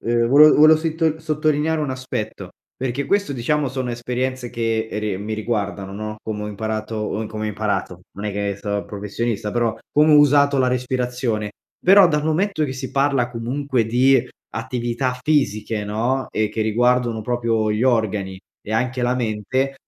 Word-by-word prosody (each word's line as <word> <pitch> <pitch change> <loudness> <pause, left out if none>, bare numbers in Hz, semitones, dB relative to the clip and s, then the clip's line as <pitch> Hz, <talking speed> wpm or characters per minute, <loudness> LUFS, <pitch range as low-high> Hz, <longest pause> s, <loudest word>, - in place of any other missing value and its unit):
uhm, 115 0 +2
vole 150 +4 +8
vole 155 +1 +7
sittol 160 0 -1
sottolineare 155 0 0
un 145 - -2
aspetto, 130 -4 -5 0.2
perché, 130 +2 -3
questo, 200 -3 0
diciamo, 140 +4 0
sono 130 -1 -3
esperienze 125 +1 -3
che 115 -1 -1
re 105 -3 -2
mi 105 +2 -4
riguardano, 100 -3 -3
no, 110 +1 -5
come 105 -1 -4
ho - - -4
imparato 110 +1 -3
uhm, 110 +1 -3
come 110 0 -5
ho 110 - -1
imparato, 100 -4 -2
non 100 +2 -8
è 105 - -2
che 100 0 -2
so 100 0 -2
professionista, 105 +1 -3
però, 120 -2 0 0.2
come 150 +1 +5
ho - - +8
usato 145 -1 +5
la 130 -1 +3
respirazione. 125 -3 -2 0.3
Però, 195 0 +7
dal 150 -2 0
momento 160 +1 0
che 130 - -3
si 130 0 -6
parla 135 -3 +1
comunque 125 +1 -1
di 125 +2 +3 0.3
attività 120 +2 -2
fisiche, 110 -7 0
no, 120 +5 -1
e 110 -1 0
che 110 +1 -2
riguardano 120 +1 +1
proprio 115 -2 0
gli 105 +2 0
organi, 105 -6 0 0.2
e 110 - -6
anche 125 +2 -1
la 120 +1 +1
mente, 125 +3 -1
120 Hz, 170 wpm, -21 LUFS, 110-135 Hz, 0.3 s, vole